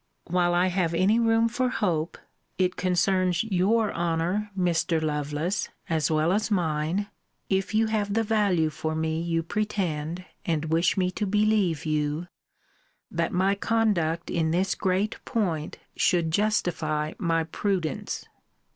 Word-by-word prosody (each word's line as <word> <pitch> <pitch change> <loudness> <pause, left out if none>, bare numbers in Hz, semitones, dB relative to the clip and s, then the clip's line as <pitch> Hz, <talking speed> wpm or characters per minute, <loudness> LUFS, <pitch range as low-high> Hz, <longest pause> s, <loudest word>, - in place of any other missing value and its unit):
While 175 0 +1
I 175 +1 +4
have 180 -2 0
any 195 +6 +3
room 225 0 +3
for 250 +2 0
hope, 170 -9 -1 0.4
it 185 -1 +1
concerns 185 0 +1
your 215 +2 +1
honour, 175 +5 -1
Mr. 175 -2 +1
Lovelace, 150 +4 -2 0.2
as 160 -2 +1
well 155 +2 +2
as 215 +2 0
mine, 170 0 0 0.5
(if 190 +2 0
you 225 +1 +4
have 210 -2 -1
the 225 - +3
value 200 -8 +2
for 155 +1 -3
me 160 0 -1
you 165 -1 0
pretend, 180 -4 -2 0.2
and 160 -2 -1
wish 170 +4 +2
me 185 -1 +1
to 210 +2 -2
believe 205 -6 +2
you,) 150 +1 -1 0.9
that 170 -1 -1
my 190 +2 +2
conduct 200 -7 0
in 160 -2 +1
this 185 +3 +1
great 190 +3 0
point 175 -10 -2 0.2
should 170 -3 +2
justify 160 -6 0
my 165 -2 +1
prudence. 165 -2 -2
180 Hz, 140 wpm, -26 LUFS, 160-205 Hz, 0.9 s, I